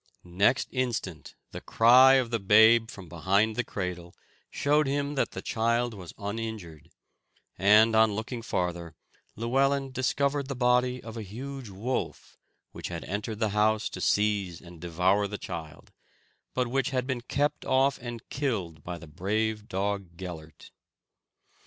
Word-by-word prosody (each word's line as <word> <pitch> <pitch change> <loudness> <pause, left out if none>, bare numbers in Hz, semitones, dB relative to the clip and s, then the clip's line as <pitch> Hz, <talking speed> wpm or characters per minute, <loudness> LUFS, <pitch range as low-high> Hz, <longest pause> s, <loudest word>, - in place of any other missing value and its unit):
Next 100 +9 +1
instant 120 - -3 0.2
the - - -7
cry 130 +4 +6
of 125 -3 +1
the 115 - 0
babe 110 +3 +5
from 95 -3 -10
behind 100 +7 +1
the 125 - 0
cradle 90 -4 -5 0.3
showed 150 +1 +1
him 140 +1 -1
that 140 - -1
the - - -6
child 115 +1 0
was 90 -5 -9
uninjured; 100 -7 -6 0.7
and, 105 +3 +5
on 110 -1 +5
looking 115 +3 -4
farther, 85 -6 -3 0.4
Llewellyn 135 +4 +1
discovered 140 +2 0
the 140 - -4
body 125 0 +1
of 115 0 -8
a - - -4
huge 125 +4 -7
wolf, 110 +7 -4 0.3
which - - -7
had 85 -2 -6
entered 105 +2 -4
the 110 -1 0
house 105 +1 +1
to - - -8
seize 100 -5 +1
and 85 -2 -14
devour 90 +4 +1
the 105 +1 -5
child, 85 -6 -8 0.6
but 125 -1 +1
which 135 +2 0
had 125 -1 -1
been 130 -2 -3
kept 145 +4 -1
off 135 +1 +2
and 120 -2 -8
killed 100 - -3
by 90 0 -5
the 85 - -11
brave 105 +6 -2
dog 95 -3 -3
Gellert. 80 -5 -9
110 Hz, 150 wpm, -28 LUFS, 95-125 Hz, 0.7 s, cry